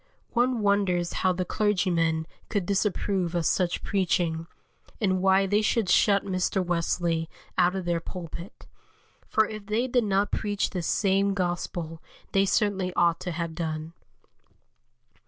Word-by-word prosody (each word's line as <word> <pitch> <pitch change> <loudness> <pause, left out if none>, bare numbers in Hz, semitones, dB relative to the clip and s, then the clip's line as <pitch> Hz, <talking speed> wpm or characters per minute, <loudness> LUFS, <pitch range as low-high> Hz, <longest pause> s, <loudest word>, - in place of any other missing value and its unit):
One 245 -1 +1
wonders 195 -4 +1
how 185 - +2
the 180 0 -2
clergymen 175 -6 +1 0.2
could 205 -5 -1
disapprove 195 -2 0
of 170 -2 0
such 180 +1 +1
preaching, 170 -4 0 0.5
and 185 -4 +1
why 190 +1 +4
they 205 +2 +2
should 215 -2 +1
shut 200 +2 +4
Mr. 185 0 0
Wesley 170 -1 0 0.3
out 180 +1 +3
of 190 -2 -3
their 170 -1 +1
pulpit, 170 +3 -8 0.6
for 220 - +3
if 215 -1 -8
they 220 +4 +1
did 245 -2 +1
not 200 0 +1
preach 205 -2 -1
this 180 -4 -3
same 195 0 +2
Gospel 175 -3 -3 0.3
they 195 0 +3
certainly 195 -2 +1
ought 170 -1 +3
to 180 0 -4
have 170 0 -3
done. 160 -1 -4
185 Hz, 140 wpm, -27 LUFS, 170-200 Hz, 0.6 s, why